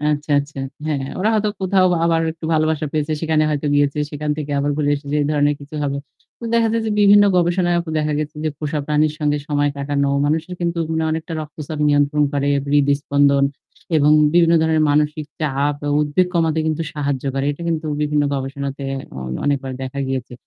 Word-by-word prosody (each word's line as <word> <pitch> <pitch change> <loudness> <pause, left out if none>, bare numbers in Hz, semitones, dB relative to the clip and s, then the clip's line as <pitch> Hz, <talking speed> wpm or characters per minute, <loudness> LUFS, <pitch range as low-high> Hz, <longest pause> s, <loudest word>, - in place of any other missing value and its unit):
আচ্ছা, 150 0 -1
আচ্ছা। 140 0 -5 0.3
হ্যাঁ, 150 -3 -1
হ্যাঁ। 135 - -6
ওরা 210 - +2
হয়তো 215 -1 +1
কোথাও 190 0 +3 0.2
আবার 165 -1 +2
একটু 165 - -13
ভালোবাসা 155 0 +1
পেয়েছে 155 0 -1
সেখানে 160 -1 +1
হয়তো 150 0 -2
গিয়েছে, 145 0 +2
সেখান 150 0 -3
থেকে 150 -1 -5
আবার 145 +1 0
ঘুরে 145 -1 +1
এসেছে 145 0 -3
এ - - -1
ধরনের 145 0 +2
কিছু 145 +2 -12
হবে। 140 -1 -1 0.4
তো - - -9
দেখা 230 -1 +3
যায় 230 0 0
যে - - -1
বিভিন্ন 205 0 +7
গবেষণায়ও 175 0 +2
তো - - -4
দেখা 150 0 0
গেছে 150 0 -4
যে - - +2
পোষা 150 0 -2
প্রাণীর 150 0 +2
সঙ্গে 150 -1 0
সময় 145 -1 +1
কাটানো 140 0 0 0.2
মানুষের 160 +4 -1
কিন্তু 170 -1 -1
উম 160 - 0
অনেকটা 160 +1 -4
রক্তচাপ 155 0 -7
নিয়ন্ত্রণ 145 +1 +2
করে, 140 0 0 0.2
হৃদস্পন্দন 140 0 +3 0.5
এবং 150 -1 +4 0.2
বিভিন্ন 170 -1 +5
ধরনের 160 -1 +2
মানসিক 150 +1 +1 0.2
চাপ 145 -1 0
আ - - 0
উদ্বেগ 150 +5 +1
কমাতে 165 -2 +1
কিন্তু 160 +1 -1
সাহায্য 140 -3 -2
করে। 135 0 -1
এটা 145 - -9
কিন্তু 160 -1 -2 0.2
বিভিন্ন 150 0 +1
গবেষণাতে 140 +1 -4 0.3
অ - - -6 0.3
অনেকবার 135 -2 -1
দেখা 130 +1 -5
গিয়েছে। 130 -2 -4
150 Hz, 190 wpm, -20 LUFS, 145-160 Hz, 0.5 s, বিভিন্ন